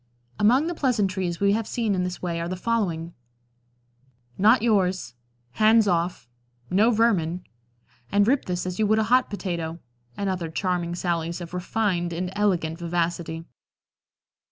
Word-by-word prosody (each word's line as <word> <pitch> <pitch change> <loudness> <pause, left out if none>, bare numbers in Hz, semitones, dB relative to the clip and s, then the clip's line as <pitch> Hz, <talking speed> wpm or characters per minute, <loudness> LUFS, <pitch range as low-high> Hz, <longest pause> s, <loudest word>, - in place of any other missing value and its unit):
Among 250 +8 +4
the 345 - -2
pleasantries 195 - 0
we 200 0 +3
have 220 0 -1
seen 225 -4 -1
in 180 -1 0
this 180 0 -5
way 170 -2 -2
are 170 - -3
the 185 - -2
following: 180 -6 -1 1.2
"Not 220 +3 +4
yours," 185 - +1 0.4
"Hands 220 - +4
off," 175 -7 0 0.4
"No 205 +5 +4
vermin," 190 -7 +1 0.7
and 205 +1 +3
"Rip 270 +2 +2
this 180 0 -2
as 185 +1 -4
you 215 - +3
would 215 +1 +3
a 220 - +3
hot 255 - +4
potato," 170 -5 -4 0.4
and 200 - -2
other 180 -3 -2
charming 175 0 -1
sallies 170 -1 -2
of 175 0 -8
refined 180 -2 -1
and 180 +2 -3
elegant 175 -6 0
vivacity. 170 -1 -2
185 Hz, 150 wpm, -25 LUFS, 170-215 Hz, 1.2 s, Among